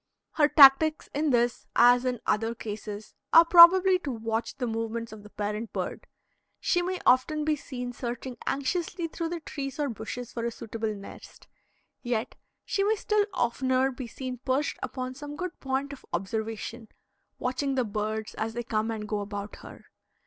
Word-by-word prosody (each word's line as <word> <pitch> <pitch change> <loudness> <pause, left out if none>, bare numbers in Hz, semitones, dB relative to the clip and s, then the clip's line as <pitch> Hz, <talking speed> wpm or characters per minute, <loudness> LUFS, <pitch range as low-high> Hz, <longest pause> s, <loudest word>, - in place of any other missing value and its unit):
Her 295 -2 +4
tactics 300 +2 +6
in 300 +2 0
this 240 -1 +1
as 245 +1 +6
in 250 -2 -1
other 225 +2 0
cases 210 -1 -7 0.2
are 330 +1 +9
probably 365 +2 +8
to 295 - -5
watch 225 -1 -3
the 250 - -2
movements 230 0 -3
of 215 -1 -10
the 210 - -13
parent 210 +2 -4
bird. - - -4 0.5
She 350 - +1
may 365 +1 -2
often 295 +4 +3
be 310 -1 +2
seen 250 -4 -6
searching 245 +1 -5
anxiously 335 +5 -1
through 330 0 -4
the 340 -1 -4
trees 275 -2 -6
or 290 -1 0
bushes 235 +2 -6
for 230 - -4
a 235 - 0
suitable 225 -1 -4
nest, 200 0 -12 0.5
yet 240 -2 -2 0.3
she 395 - 0
may 425 +2 +2
still 420 0 +1
oftener 260 +2 +1
be 255 -1 -7
seen 255 0 -6
perched 265 +3 -1
upon 255 -1 -4
some 290 +2 -8
good 360 +1 -5
point 270 +1 -2
of 280 - -12
observation 220 +4 -4 0.5
watching 265 +2 -1
the 255 -2 +1
birds 215 +1 -3
as 225 +1 -4
they 240 - -3
come 220 -1 -1
and 215 -2 -4
go 210 -1 -2
about 205 0 -6
her. - - -13
250 Hz, 170 wpm, -27 LUFS, 225-290 Hz, 0.5 s, are